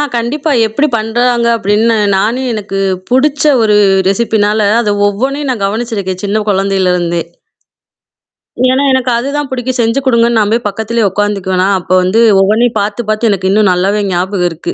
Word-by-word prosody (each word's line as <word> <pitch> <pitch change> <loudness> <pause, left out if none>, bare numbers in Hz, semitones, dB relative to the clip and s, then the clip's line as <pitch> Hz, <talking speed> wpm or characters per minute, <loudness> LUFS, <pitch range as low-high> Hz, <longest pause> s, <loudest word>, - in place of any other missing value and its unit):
கண்டிப்பா 275 +6 -2 0.2
எப்படி 285 +8 0
பண்றாங்க 235 +2 0
அப்படின்னு 220 +2 +1 0.2
நானும், 235 +7 -1
எனக்குப் 195 -3 -3
புடிச்ச 280 +3 +1 0.2
ஒரு 215 -2 +2 0.3
ரெஸிப்பீனால 210 0 +1
அத 205 -2 -1
ஒவ்வொண்ணையும் 265 +7 -2
நான் 215 -6 -2
கவனிச்சிருக்கேன். 200 -3 -3
சின்னக் 210 +1 -1
கொழந்தையில 195 -2 +1
இருந்தே. 170 -1 -1 1.5
ஏன்னா, 260 +2 +1
எனக்கு 260 -1 0
அதுதான் 280 +4 -3
புடிக்கும். 255 0 -3
செஞ்சு 230 +3 +1
கொடுங்கன்னு 235 -2 +2
நான் 210 -1 0
போய் 235 0 -1
பக்கத்துலயே 220 +2 -1
உக்காந்துக்குவேனா! 195 -2 -1
அப்ப 180 - -10
வந்து 185 +5 +1 0.2
ஒவ்வொண்ணையும் 220 +4 +1
பாத்துப் 205 +2 -3
பாத்து 215 +1 +1
எனக்கு 190 -1 -1
இன்னும் 210 -1 +3
நல்லாவே 195 +4 0
ஞாபகம் 180 +1 -1
இருக்கு. 165 0 -6
215 Hz, 145 wpm, -12 LUFS, 195-240 Hz, 1.5 s, இன்னும்